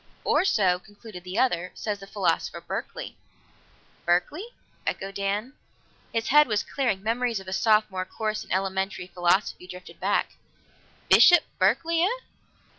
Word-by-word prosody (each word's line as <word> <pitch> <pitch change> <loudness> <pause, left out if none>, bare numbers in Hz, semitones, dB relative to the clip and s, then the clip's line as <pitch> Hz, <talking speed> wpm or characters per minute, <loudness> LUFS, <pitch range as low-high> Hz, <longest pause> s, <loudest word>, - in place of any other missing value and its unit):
"Or - - +3
so," 190 - +2
concluded 205 -1 -12
the 180 +3 -6
other, 180 -9 +1
"says 210 -2 -3
the 195 - -11
philosopher 185 -5 -1
Berkeley." - - -6 0.9
"Berkeley?" 180 - 0 0.4
echoed 195 +1 -3
Dan. 200 +6 -2 0.6
His 225 -1 -1
head 300 +2 +6
was 210 -3 0
clearing; 235 -9 -1
memories 230 0 0
of 190 - -13
a 185 - -4
Sophomore 210 -3 +2
course 215 +2 -3
in - - -15
Elementary 190 0 -1
Philosophy 180 +1 0
drifted 180 0 -11
back. - - 0 0.7
"Bishop 350 -3 +7 0.2
Berkeley, 320 - +2
eh?" 440 +8 +1
205 Hz, 135 wpm, -26 LUFS, 185-240 Hz, 0.9 s, Bishop